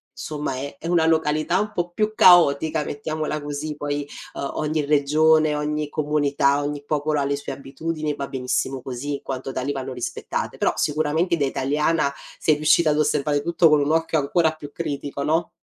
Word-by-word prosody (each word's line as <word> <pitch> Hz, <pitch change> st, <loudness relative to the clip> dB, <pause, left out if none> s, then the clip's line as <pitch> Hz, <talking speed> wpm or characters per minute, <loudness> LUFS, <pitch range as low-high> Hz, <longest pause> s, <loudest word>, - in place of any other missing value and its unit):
insomma, 150 Hz, -2 st, -4 dB
è 140 Hz, +2 st, -6 dB
è 165 Hz, -, -7 dB
una 170 Hz, -2 st, +3 dB
località 160 Hz, +2 st, +1 dB
un 210 Hz, 0 st, -2 dB
po' 175 Hz, 0 st, -2 dB
più 215 Hz, +5 st, -1 dB
caotica, 160 Hz, -5 st, +5 dB
mettiamola 155 Hz, +1 st, -3 dB
così, 145 Hz, +1 st, -4 dB
poi, 145 Hz, 0 st, -3 dB, 0.3 s
uhm, 140 Hz, -, -4 dB
ogni 155 Hz, -1 st, -1 dB
regione, 155 Hz, +1 st, +3 dB
ogni 150 Hz, 0 st, -2 dB
comunità, 145 Hz, -2 st, +1 dB
ogni 145 Hz, 0 st, -4 dB
popolo 150 Hz, 0 st, 0 dB
ha -, -, +1 dB
le 140 Hz, 0 st, 0 dB
sue 140 Hz, -, -6 dB
abitudini, 155 Hz, +3 st, -4 dB
e -, -, -4 dB
va 140 Hz, -1 st, -4 dB
benissimo 130 Hz, 0 st, -2 dB
così, 135 Hz, +3 st, -4 dB
in 140 Hz, -, -4 dB
quanto 130 Hz, 0 st, -5 dB
tali, 130 Hz, +2 st, -2 dB
vanno 135 Hz, -1 st, -4 dB
rispettate. 125 Hz, -1 st, -4 dB
Però, -, -, +2 dB
sicuramente, 155 Hz, +4 st, +1 dB
da 140 Hz, -, +1 dB
italiana, 145 Hz, +2 st, 0 dB, 0.2 s
sei 155 Hz, -, +2 dB
riuscita 155 Hz, +1 st, +3 dB
ad 150 Hz, -, +1 dB
osservare 145 Hz, -1 st, +1 dB
tutto, 170 Hz, 0 st, +3 dB
con 150 Hz, -1 st, +5 dB
un 145 Hz, +2 st, +1 dB
occhio 160 Hz, -1 st, +1 dB
ancora 160 Hz, +3 st, +2 dB
più 150 Hz, -2 st, -10 dB
critico, 140 Hz, -1 st, -4 dB
no? 160 Hz, +3 st, +1 dB
150 Hz, 185 wpm, -23 LUFS, 140-155 Hz, 0.3 s, caotica